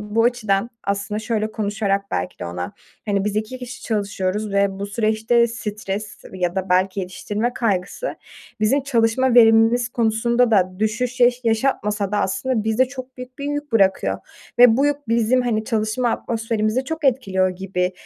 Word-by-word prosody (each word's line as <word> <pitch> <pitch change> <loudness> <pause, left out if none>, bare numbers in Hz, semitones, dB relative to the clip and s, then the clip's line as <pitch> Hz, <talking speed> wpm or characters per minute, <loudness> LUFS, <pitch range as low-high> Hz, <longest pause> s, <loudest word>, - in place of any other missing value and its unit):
bu 210 +2 0
açıdan 235 -3 +1
aslında 200 +1 -2
şöyle 220 -1 -2
konuşarak 200 -2 -1
belki 90 0 -3
de - - -5
ona, 90 +1 -5 0.3
hani, 200 -1 0
biz 210 0 -2
2 220 +4 -3
kişi 250 +1 -8
çalışıyoruz 205 -1 -2
ve 200 -1 +1
bu 200 - -3
süreçte 220 +2 +2
stres 210 -2 -5 0.2
ya 180 -1 -1
da 190 0 -2
belki 185 +2 +2
yetiştirme 205 +6 -3
kaygısı 205 - -2 0.4
bizim 265 +7 +3
çalışma 245 -1 +2
verimimiz 225 +1 +5
konusunda 235 +1 +1
da 185 -3 +2
düşüş 240 +4 -1
yaş 245 0 +4
yaşatmasa 215 -4 0
da 205 - +1
aslında 210 +5 -1
bize 220 +4 +3
çok 260 0 -9
büyük 250 +2 -10
bir 280 - -5
yük 290 -2 -4
bırakıyor 195 -4 +2 0.4
ve 240 -2 +7
bu 275 +2 +3
yük 290 -3 -2
bizim, 235 +2 +2
hani, 220 -3 -1
çalışma 220 +1 0
atmosferimizi 225 +2 -1
çok 320 +1 -5
etkiliyor 195 -8 +2
gibi, 185 0 -2
220 Hz, 160 wpm, -21 LUFS, 200-245 Hz, 0.4 s, ve